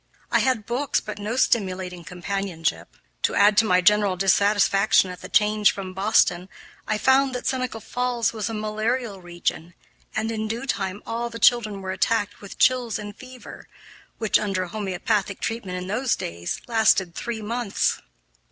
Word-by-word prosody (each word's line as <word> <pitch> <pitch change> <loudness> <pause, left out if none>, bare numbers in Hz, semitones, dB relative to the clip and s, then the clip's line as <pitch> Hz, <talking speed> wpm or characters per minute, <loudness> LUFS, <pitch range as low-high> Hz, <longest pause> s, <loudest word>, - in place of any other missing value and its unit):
I - - +4
had 255 -5 +1
books, 255 +6 0
but 215 - -7
no 210 +3 -3
stimulating 185 -7 0
companionship. 180 -1 -3 0.2
To - - 0
add 205 +1 +5
to 220 - +6
my 185 -3 +3
general 205 -1 +3
dissatisfaction 195 +1 +3
at 180 - -10
the - - -9
change 210 -1 +4
from 190 -2 -7
Boston, 190 -2 +2 0.4
I 215 - 0
found 265 +2 +3
that 250 - -5
Seneca 255 -3 -2
Falls 245 +1 -1
was 215 -1 -3
a 225 - -4
malarial 215 0 -2
region, 175 -1 -4 0.4
and 220 +1 -1
in 220 -1 -3
due 230 +4 -4
time 200 -5 -3
all 235 +1 -3
the 230 - -7
children 215 -5 +3
were 190 - -3
attacked 205 +2 0
with 200 - -10
chills 245 -4 +2
and 205 -1 -8
fever 255 0 -12 0.5
which, 220 -3 +2
under 195 -3 -1
homeopathic 200 +1 -2
treatment 215 -6 -3
in 180 - -5
those 235 +6 0
days, 85 +1 -5
lasted 220 -6 +3
three 225 +3 -5
months. 230 -1 -1
210 Hz, 160 wpm, -24 LUFS, 190-230 Hz, 0.5 s, to